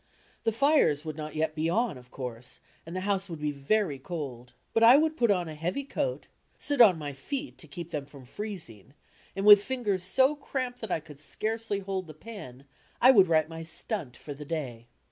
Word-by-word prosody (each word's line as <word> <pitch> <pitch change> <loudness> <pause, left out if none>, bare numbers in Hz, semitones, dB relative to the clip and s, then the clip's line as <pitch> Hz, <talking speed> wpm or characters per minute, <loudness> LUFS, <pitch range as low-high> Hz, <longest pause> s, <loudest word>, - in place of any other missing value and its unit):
The 225 - +3
fires 230 - +3
would 155 -2 -4
not 155 -1 -6
yet 155 0 0
be 155 +1 -1
on, 230 +1 +1
of 125 -1 -14
course, 125 -2 -6 0.3
and 170 - -7
the 185 - -2
house 195 0 -1
would 165 - -5
be 150 0 -1
very 145 +2 0
cold. 130 -6 -6 0.2
But 225 - +2
I 235 +4 +9
would 315 +1 +2
put 240 -7 +2
on 180 -4 +2
a 160 - -6
heavy 175 - -2
coat, - - -3 0.3
sit 285 -3 +2
on 195 -7 +8
my 145 -2 -5
feet 275 - -5
to 160 - -10
keep 170 +3 -8
them 145 -3 -4
from 140 -3 -13
freezing 145 - -7 0.4
and 195 +1 -2
with 205 -1 +10
fingers 210 -8 -1
so 260 +10 +4
cramped 255 -3 -4
that 220 - -5
I 160 - 0
could 150 -2 -14
scarcely 215 +5 -3
hold 190 -2 -3
the 155 - -10
pen, 155 - -10 0.3
I 255 - +8
would 195 -7 +6
write 160 -2 +3
my 165 0 -7
"stunt" 160 - -3
for 145 - -8
the 145 +1 -9
day. 135 -7 -5
170 Hz, 210 wpm, -29 LUFS, 145-220 Hz, 0.4 s, with